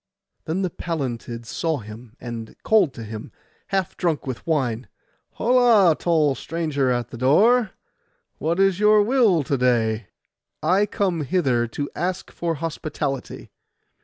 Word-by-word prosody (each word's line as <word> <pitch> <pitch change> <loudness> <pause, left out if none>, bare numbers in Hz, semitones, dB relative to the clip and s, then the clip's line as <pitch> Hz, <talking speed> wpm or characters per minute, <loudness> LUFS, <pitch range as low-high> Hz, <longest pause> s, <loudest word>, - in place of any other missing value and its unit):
Then 175 +5 -1
the 185 - -1
Pallantids 120 -9 -4
saw 160 +6 -1
him, 110 +1 -11
and 115 -2 -7
called 205 -9 +4
to 115 - -7
him, 110 0 -8 0.4
half 195 -3 -1
drunk 170 -5 -1
with 130 +2 -6
wine, 130 -7 0 0.5
'Holla, 230 -8 +4
tall 155 -5 +2
stranger 145 -1 -2
at 120 -1 -1
the 120 - -8
door, 210 - +4 0.7
what 165 +4 -1
is 195 -1 +3
your 210 0 +5
will 215 - +3
to 140 +1 -1
day?' 115 -4 +1 0.6
'I 200 +3 +3
come 185 -5 -1
hither 130 -7 +1
to 145 +5 -4
ask 180 +1 -3
for 170 -1 -2
hospitality. 150 -3 -4
155 Hz, 135 wpm, -23 LUFS, 125-185 Hz, 0.7 s, your